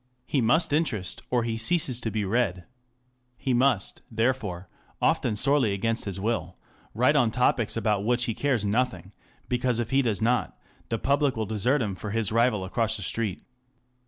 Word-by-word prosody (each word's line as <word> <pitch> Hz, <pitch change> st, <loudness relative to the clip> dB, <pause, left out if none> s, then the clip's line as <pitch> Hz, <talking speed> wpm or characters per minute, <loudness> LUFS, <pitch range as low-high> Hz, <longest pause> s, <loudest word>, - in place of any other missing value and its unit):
He 140 Hz, -, 0 dB
must 145 Hz, +7 st, +2 dB
interest, 110 Hz, -, -1 dB
or 120 Hz, -2 st, +1 dB
he 115 Hz, -1 st, -2 dB
ceases 135 Hz, -2 st, +1 dB
to 115 Hz, -, -2 dB
be 105 Hz, -1 st, -2 dB
read. 95 Hz, -4 st, 0 dB, 0.7 s
He 130 Hz, -, -1 dB
must 120 Hz, -5 st, +1 dB
therefore, 110 Hz, -6 st, -1 dB, 0.3 s
often 105 Hz, -, +1 dB
sorely 130 Hz, -1 st, +2 dB
against 115 Hz, +4 st, -1 dB
his 95 Hz, -2 st, -4 dB
will, 115 Hz, +3 st, -2 dB, 0.4 s
write 125 Hz, +6 st, +3 dB
on 125 Hz, -6 st, +4 dB
topics 115 Hz, -1 st, +1 dB
about 105 Hz, -3 st, 0 dB
which 120 Hz, +2 st, +1 dB
he 115 Hz, -, -1 dB
cares 125 Hz, -3 st, 0 dB
nothing, 100 Hz, -4 st, -1 dB, 0.3 s
because 125 Hz, -1 st, 0 dB
if 115 Hz, -1 st, -3 dB
he 135 Hz, +1 st, +4 dB
does 115 Hz, -6 st, 0 dB
not, 120 Hz, +3 st, 0 dB, 0.3 s
the 115 Hz, -, 0 dB
public 140 Hz, 0 st, +1 dB
will 110 Hz, -, -1 dB
desert 115 Hz, +6 st, +1 dB
him 100 Hz, -3 st, -2 dB
for 105 Hz, +3 st, -6 dB
his 110 Hz, 0 st, 0 dB
rival 115 Hz, -4 st, +2 dB
across 110 Hz, +3 st, 0 dB
the 100 Hz, -, -6 dB
street. 105 Hz, 0 st, -2 dB
115 Hz, 175 wpm, -26 LUFS, 105-125 Hz, 0.7 s, on